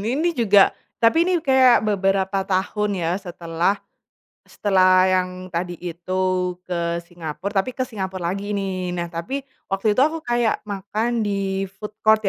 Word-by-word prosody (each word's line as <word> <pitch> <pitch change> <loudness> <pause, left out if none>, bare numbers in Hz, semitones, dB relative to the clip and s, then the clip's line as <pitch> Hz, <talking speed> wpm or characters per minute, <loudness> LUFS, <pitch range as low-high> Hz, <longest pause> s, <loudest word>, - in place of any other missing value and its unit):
ini 340 +4 +1
juga, 205 -6 +5 0.3
tapi 325 +10 +5
ini 355 -3 +1
kayak 260 -4 +5
beberapa 195 -1 +1
tahun 205 +2 0
ya 165 - +1
setelah, 175 +1 -1 0.7
setelah 185 -2 +4
yang 185 0 +2 0.2
tadi 175 0 -3
itu 180 +1 -1
ke 170 -1 -2
Singapura 170 +2 -6
tapi 245 +6 -1
ke 255 - -1
Singapura 190 -7 -3
lagi 200 +2 -3
nih 185 -3 -2
nah 170 -1 -3
tapi 215 +12 -4 0.2
waktu 195 +3 0
itu - - +6
aku 320 0 -4
kayak 240 -2 0
makan 210 +3 -2
di-food 195 +1 -3
court 220 0 +4
195 Hz, 140 wpm, -22 LUFS, 180-215 Hz, 0.7 s, itu